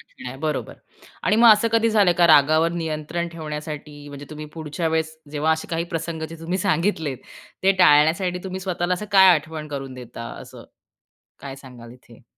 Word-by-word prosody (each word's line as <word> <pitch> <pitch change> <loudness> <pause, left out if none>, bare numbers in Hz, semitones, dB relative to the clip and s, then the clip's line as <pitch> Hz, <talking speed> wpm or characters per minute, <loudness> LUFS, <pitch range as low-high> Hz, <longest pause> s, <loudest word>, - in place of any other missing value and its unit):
ऐकत - - -18
नाही 125 +1 -6
बरोबर 155 -3 -3 0.5
आणि 210 - +2
मग 230 0 +7
असं 215 +2 +2
कधी 230 0 +3
झालंय 200 -5 +4
का 170 - +6
रागावर 155 +2 +5
नियंत्रण 165 +1 -3
ठेवण्यासाठी 150 -2 -7
म्हणजे 145 0 -10
तुम्ही 155 0 -8
पुढच्या 160 +1 -3
वेळेस, 160 0 -2
जेव्हा 155 +2 +1
असे 160 - -4
काही 165 0 -1
प्रसंग 165 0 -4
जे 165 - -9
तुम्ही 175 +3 -3
सांगितलेत, 165 -7 -1 0.4
ते 195 - +5
टाळण्यासाठी 170 +5 +4
तुम्ही 190 0 -5
स्वतःला 180 -1 -1
असं 210 +4 -7
काय 190 -1 +7
आठवण 155 0 -5
करून 135 -2 -6
देता 120 -2 -9 0.2
असं, - - -12 0.8
काय 135 -1 -8
सांगाल 120 -3 -13
इथे? 125 -1 -18
160 Hz, 175 wpm, -22 LUFS, 150-175 Hz, 0.8 s, मग